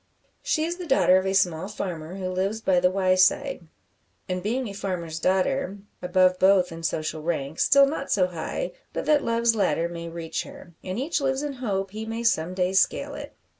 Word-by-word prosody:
She 425 -11 0
is 340 +2 -2
the 360 -2 -7
daughter 185 -9 +5
of 190 - -3
a 190 - 0
small 175 -1 +1
farmer 180 -5 -5
who 190 -1 -4
lives 190 +4 -1
by 190 -5 +2
the 180 0 +3
Wyeside; 185 - +2 0.6
and 185 -1 -2
being 240 +6 -1
a 200 - -7
farmer's 175 -5 -4
daughter, 195 +6 0 0.2
above 185 0 +3
both 190 -2 +4
in 165 0 -8
social 155 -1 -2
rank, 155 -2 -3
still 280 0 +6
not 275 0 -4
so 190 -3 +4
high 180 - -4 0.2
but - - -3
that 300 -2 +3
Love's 230 0 +2
ladder 170 -6 +1
may 170 -1 -7
reach 165 -1 -4
her, 175 - -12
and 185 +1 -4
each 285 +5 -1
lives 270 0 0
in 290 -1 -3
hope 195 -7 -3
he 220 +2 -6
may 225 +1 -4
some 180 -6 +1
day 185 0 0
scale 195 - +1
it. - - -8
190 Hz, 200 wpm, -25 LUFS, 175-230 Hz, 0.6 s, still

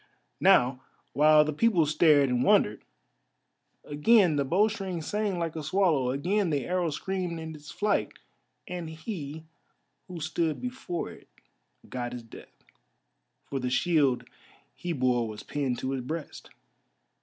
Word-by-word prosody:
Now 130 -9 +4 0.3
while 150 +1 +6
the 155 - -2
people 180 -1 +3
stared 150 -2 +4
and 125 -1 +1
wondered, 130 - +3 1.0
again 170 +3 +4
the 140 - +1
bowstring 190 +3 0
sang 205 +1 -1
like 165 -2 -3
a 160 - -4
swallow, 155 -5 +2
again 180 +9 0
the 145 -4 -1
arrow 180 -2 0
screamed 180 +1 -3
in 160 0 -6
its 150 -1 -12
flight, 205 -1 0 0.5
and 175 -3 -5
he 160 -2 -7 0.6
who 180 -2 -7
stood 160 0 -1
before 250 -9 -4
it - - -15 0.6
got 120 -1 -4
his 120 -1 -7
death, 115 - -15 0.8
for 135 - -4
the 125 -1 -2
shield 145 -3 +2 0.5
he 175 - -5
bore 125 -5 +1
was 105 -1 -8
pinned 135 -4 -2
to 130 - -3
his 135 -1 -2
breast. 155 +4 -6
155 Hz, 140 wpm, -28 LUFS, 140-180 Hz, 1.0 s, while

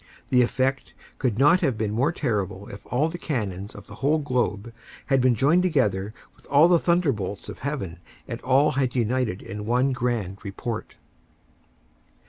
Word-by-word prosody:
The 125 -1 +5
effect 130 +2 0 0.2
could 120 -6 0
not 150 +8 +5
have 135 -10 0
been 110 -1 -1
more 130 +9 +1
terrible 100 - -2
if 100 - -11
all 140 +6 +1
the 175 +2 -6
cannons 100 - -3
of 100 - -11
the - - -12
whole 145 +3 +3
globe 120 -6 -1 0.3
had 135 -1 +2
been 125 -1 +4
joined 150 +10 +4
together 105 - +1 0.2
with - - -18
all 145 +4 +6
the 175 -1 +5
thunderbolts 140 - 0
of - - -8
heaven 100 - -4 0.3
and - - -5
all 135 +4 +3
had 130 -2 -1
united 120 -4 0
in 105 +2 -6
one 125 +3 +2
grand 115 -7 -2
report. 105 +3 -5
125 Hz, 165 wpm, -25 LUFS, 105-140 Hz, 0.3 s, all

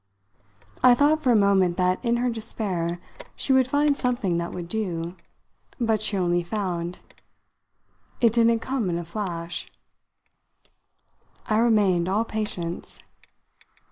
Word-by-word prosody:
I 250 -1 +7
thought 295 +4 +3
for 265 -5 +2
a - - +5
moment 195 -4 +3
that, 185 +2 +1
in 235 -1 +1
her 245 +1 0
despair, 195 -7 -3 0.4
she 270 - 0
would 260 -1 +4
find 285 +1 +2
something 240 -10 0
that 170 0 -3
would 175 -1 -6
do. 175 -4 -3 0.6
But 225 -3 +1
she 215 -1 0
only 175 -1 +1
found: 175 -2 -3 1.2
"It 230 -3 +4
didn't 230 -1 +3
come 260 -7 -2
in 170 - -1
a 170 - -5
flash." 170 -2 -5 1.8
I 215 -1 +1
remained 200 -7 +3
all 210 +4 +1
patience. 200 -6 -4
210 Hz, 130 wpm, -25 LUFS, 175-235 Hz, 1.8 s, I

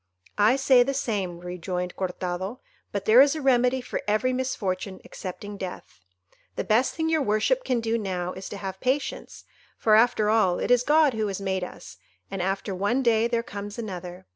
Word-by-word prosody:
"I 215 +5 +5
say 265 -2 +5
the 275 +3 +1
same," 190 -8 -2
rejoined 180 0 -4
Cortado, 185 +4 -4 0.3
"but 200 -1 -3
there 230 +4 +8
is 285 +2 +4
a - - -3
remedy 255 -1 +3
for - - -4
every 215 +5 +1
misfortune 205 -7 -3
excepting 205 +2 -7
death. 180 - -8 0.6
The - - -2
best 230 +5 +2
thing 320 0 -1
your 320 -1 +2
worship 265 - +1
can 250 -3 0
do 225 0 0
now 180 -3 -3
is 190 - -8
to 205 - -6
have 190 -1 -6
patience, 265 +5 -2 0.3
for 215 - +2
after 220 -1 +4
all 210 -5 +3
it - - -1
is 245 -1 +5
God 300 +1 +4
who 220 -1 -1
has 195 -1 -3
made 190 -1 -2
us, 180 - -9 0.3
and 195 -2 -3
after 195 +2 -2
one 205 +8 0
day 230 -1 +3
there 235 -1 -1
comes 205 -2 -7
another. 180 -5 -7
215 Hz, 190 wpm, -26 LUFS, 190-250 Hz, 0.6 s, there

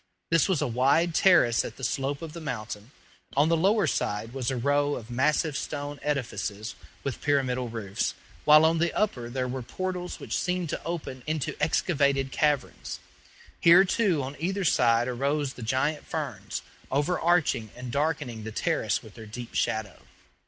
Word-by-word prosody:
This 165 +2 +4
was 180 -7 +2
a - - 0
wide 140 +8 +3
terrace 160 -11 +5
at - - -7
the 135 - -10
slope 140 +3 -1
of 160 -2 -7
the 170 - -7
mountain; 110 -5 -5 0.5
on 150 +3 +5
the 165 - +4
lower 195 +5 +3
side 105 +3 -1
was 130 -3 -1
a 130 - -1
row 145 +3 +2
of 115 +1 -8
massive 145 +4 +1
stone 145 0 -4
edifices 115 -7 -3 0.3
with 140 - -4
pyramidal 130 -4 +1
roofs, 105 -4 -2 0.3
while 155 +1 +7
on 165 +1 +3
the 170 +1 +2
upper 125 - -1
there 130 +1 -2
were 130 +1 -4
portals 180 +8 -4
which - - -4
seemed 180 -2 -1
to - - -4
open 160 -6 -5
into 155 -2 -1
excavated 140 -4 +2
caverns. 140 - -1 0.6
Here, 175 +3 +7
too, 185 -7 +1
on 135 +2 -5
either 190 +5 -1
side 120 -7 +3
arose 140 +3 -1
the - - -11
giant 130 +6 0
ferns, - - -4 0.3
overarching 155 -4 +1
and 125 0 -7
darkening 140 -6 -1
the 110 - -5
terrace - - 0
with - - -13
their 110 - -10
deep 120 +2 -8
shadow. 110 -3 -1
140 Hz, 165 wpm, -27 LUFS, 120-160 Hz, 0.6 s, while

